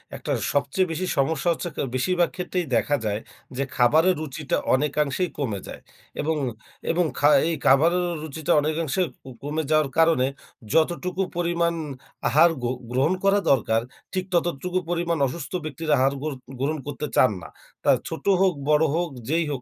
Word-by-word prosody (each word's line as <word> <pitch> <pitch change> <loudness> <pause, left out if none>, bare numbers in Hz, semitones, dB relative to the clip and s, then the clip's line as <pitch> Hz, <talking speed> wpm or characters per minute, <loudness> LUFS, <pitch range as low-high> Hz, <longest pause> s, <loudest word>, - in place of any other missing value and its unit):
১ - - -9
টা - - 0 0.2
সবচেয়ে 145 +6 +1
বেশি 185 +3 -2
সমস্যা 155 +4 +1
হচ্ছে 170 +1 -3
ক - - -26 0.2
বেশিরভাগ 175 +6 +2
ক্ষেত্রেই 180 -1 -2
দেখা 145 +6 +2
যায় 105 0 0 0.4
যে 140 - +1
খাবারের 160 +9 +4
রুচিটা 150 -1 -2 0.2
অনেকাংশেই 150 +4 0
কমে 110 -9 -2
যায়। - - -9 0.4
এবং, 160 +1 0 0.5
এবং 175 +1 +2
খা 145 - +5 0.2
এই 170 - 0
খাবারের 170 +7 +4 0.2
রুচিটা 155 0 -3
অনেকাংশে 155 +2 -1 0.2
ক - - -55 0.2
কমে 155 +2 -2
যাওয়ার 155 -2 +3
কারণে, 160 -6 +4 0.5
যতটুকু 175 +3 +1 0.2
পরিমাণ 170 -1 +1 0.5
আহার 160 +7 +5
গ - - 0 0.3
গ্রহণ 135 +7 +2
করা 195 +1 +4
দরকার, 115 -3 +2 0.3
ঠিক 185 -1 -1
ততটুকু 175 +1 0
পরিমাণ 170 -1 0
অসুস্থ 150 +3 -6
ব্যক্তির 155 +1 -5
আহার 135 +2 +3
গ্র 155 +1 -2 0.3
গ্রহণ 150 +3 0
করতে 145 +1 -4
চান 130 - +5
না। - - -10 0.3
তা - - +2 0.2
ছোট - - -6 0.2
হোক 190 -2 +4 0.2
বড় 150 +1 +5
হোক, 175 -1 0 0.2
যেই 165 +1 +2
হোক 135 - -3
160 Hz, 160 wpm, -24 LUFS, 140-175 Hz, 0.5 s, খা